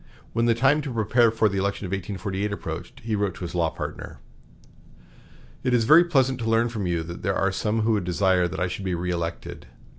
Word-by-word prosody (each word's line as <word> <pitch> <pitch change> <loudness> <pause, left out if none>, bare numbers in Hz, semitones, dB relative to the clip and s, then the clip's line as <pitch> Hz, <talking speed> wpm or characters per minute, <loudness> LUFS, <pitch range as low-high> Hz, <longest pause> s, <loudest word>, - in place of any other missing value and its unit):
When 115 +1 +1
the 115 - +3
time 135 +5 +3
to 140 -2 -5
prepare 115 +1 +3
for 110 0 +2
the 100 -1 -1
election 100 +1 -2
of 90 - -6
1848 100 +1 -3
approached, 85 -3 -6
he 110 -1 -2
wrote 100 -3 -1
to - - -13
his 85 -2 -5
law 85 -2 +1
partner: - - -7 1.5
"It 125 -1 +2
is 115 - +3
very 155 +9 +7
pleasant 135 -6 +2
to 115 -1 -2
learn 115 +1 +3
from 105 -5 -3
you 85 -2 -1
that 85 +1 -8
there 95 +1 0
are 95 - +1
some 110 +3 -1
who 110 -1 +2
desire 90 0 +2
that 85 - -6
I 90 - +1
should 90 +2 -5
be 95 - -1
reëlected. 85 -1 -4
100 Hz, 215 wpm, -25 LUFS, 90-115 Hz, 1.5 s, very